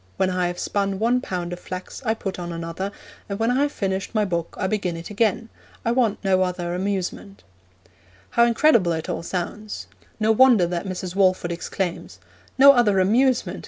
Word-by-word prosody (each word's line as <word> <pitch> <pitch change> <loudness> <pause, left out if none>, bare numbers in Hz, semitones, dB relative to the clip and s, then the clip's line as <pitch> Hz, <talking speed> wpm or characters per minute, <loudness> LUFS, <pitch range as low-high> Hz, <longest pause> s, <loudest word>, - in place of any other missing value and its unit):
When 185 -1 +1
I 180 -1 0
have 175 0 -4
spun 195 0 -1
one 235 +4 +2
pound 180 -5 -4
of 175 - -7
flax 185 +1 -7
I 220 -2 0
put 195 -4 -5
on 175 -1 -5
another, 165 +4 -4 0.4
and 200 - -3
when 225 +2 +1
I 260 +3 +2
have 290 0 +1
finished 195 -1 -3
my 215 -1 +3
book 170 -3 -3
I 190 - 0
begin 190 -4 -1
it 165 +4 -8
again. 225 +2 0 0.4
I 230 - +2
want 235 -4 +2
no 190 -1 +3
other 180 -1 -2
amusement.' 195 +1 -3 0.9
How 235 - +4
incredible 235 - +3
it 160 -1 -4
all - - -2
sounds! 190 +5 -5 0.3
No 220 0 +3
wonder 235 -5 +6
that 175 +2 -3
Mrs. 185 -1 -5
Walford 185 -3 +2
exclaims, 170 - -4 0.4
'No 280 +1 +9
other 225 -7 +3
amusement! 240 +7 +2
195 Hz, 185 wpm, -23 LUFS, 180-225 Hz, 0.9 s, No